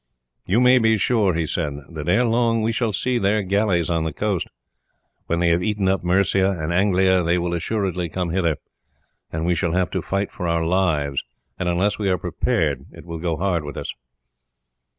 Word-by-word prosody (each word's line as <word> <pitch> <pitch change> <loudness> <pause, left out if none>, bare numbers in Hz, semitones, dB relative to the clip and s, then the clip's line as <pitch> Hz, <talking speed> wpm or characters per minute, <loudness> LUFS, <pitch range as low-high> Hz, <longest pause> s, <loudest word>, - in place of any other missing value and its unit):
"You 100 +6 +3
may 125 0 +6
be 110 -1 +3
sure," 100 -4 +2
he 85 -1 0
said, 75 -2 -2 0.2
"that 75 0 -5
ere 120 +8 +4
long 115 -1 +2
we 115 - +1
shall 115 -1 0
see 125 +5 0
their 100 +1 +1
galleys 95 -3 +1
on 85 -2 0
the 80 - -2
coast. 100 +2 -2 0.8
When 85 - 0
they 85 -1 +3
have 85 +1 +2
eaten 105 0 0
up 95 -1 +1
Mercia 95 +1 +2
and 80 +2 -2
Anglia 95 0 +3
they 85 +1 +1
will 85 0 -1
assuredly 90 -1 -2
come 90 +1 -2
hither, 85 -4 +1 0.7
and 80 +1 -3
we 90 - +2
shall 85 0 0
have 90 0 0
to 95 - -1
fight 100 +3 -2
for 90 - -4
our 85 -1 0
lives, 80 -6 +1 0.4
and 90 - 0
unless 95 +5 +1
we 100 -2 0
are 90 - +2
prepared 80 - -1
it - - -13
will 85 -1 -6
go 85 -1 -1
hard 90 -2 0
with 75 -1 -7
us." - - -4
90 Hz, 200 wpm, -22 LUFS, 85-100 Hz, 0.8 s, may